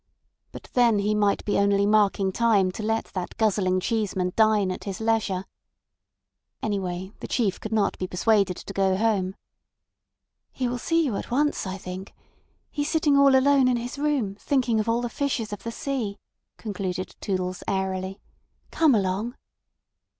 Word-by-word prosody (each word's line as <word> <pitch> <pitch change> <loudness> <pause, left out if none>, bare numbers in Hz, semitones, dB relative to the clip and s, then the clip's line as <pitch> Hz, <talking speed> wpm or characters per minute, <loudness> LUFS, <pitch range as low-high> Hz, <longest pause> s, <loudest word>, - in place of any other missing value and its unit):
But - - -10
then 240 -3 +4
he 205 +1 +1
might 205 -1 +1
be 205 - +1
only 200 0 +3
marking 205 -2 +3
time 205 -4 +3
to 200 - -7
let 225 +1 0
that 180 -2 -5
guzzling 195 -4 +2
Cheeseman 190 -4 -1
dine 215 -4 +3
at 185 - -6
his 195 -2 -4
leisure. 220 -4 0 1.2
Anyway, 190 -3 -3
the - - -6
Chief 210 -6 0
could 220 - -6
not 215 -2 +1
be 185 - -2
persuaded 195 0 +2
to 200 - -8
go 190 -1 +2
home. 195 -3 0 1.2
"He 255 - -2
will 245 0 -3
see 330 +5 +1
you 230 -8 -1
at - - -6
once, 290 -3 0
I 190 +1 -4
think. 185 0 -8 0.6
He's 290 0 -2
sitting 310 -3 +2
all 280 -1 +6
alone 270 0 +5
in 250 -1 +2
his 245 +4 -5
room 285 -9 0
thinking 250 -5 +1
of 215 +1 -1
all 230 +1 +1
the 240 - -1
fishes 235 -4 -2
of 205 - -6
the 230 - -5
sea," 235 -6 -3 0.4
concluded 185 -3 -4
Toodles 185 -2 -2
airily. 190 0 -2 0.5
"Come 310 -6 +4
along." 205 +5 -1
210 Hz, 165 wpm, -25 LUFS, 190-240 Hz, 1.2 s, all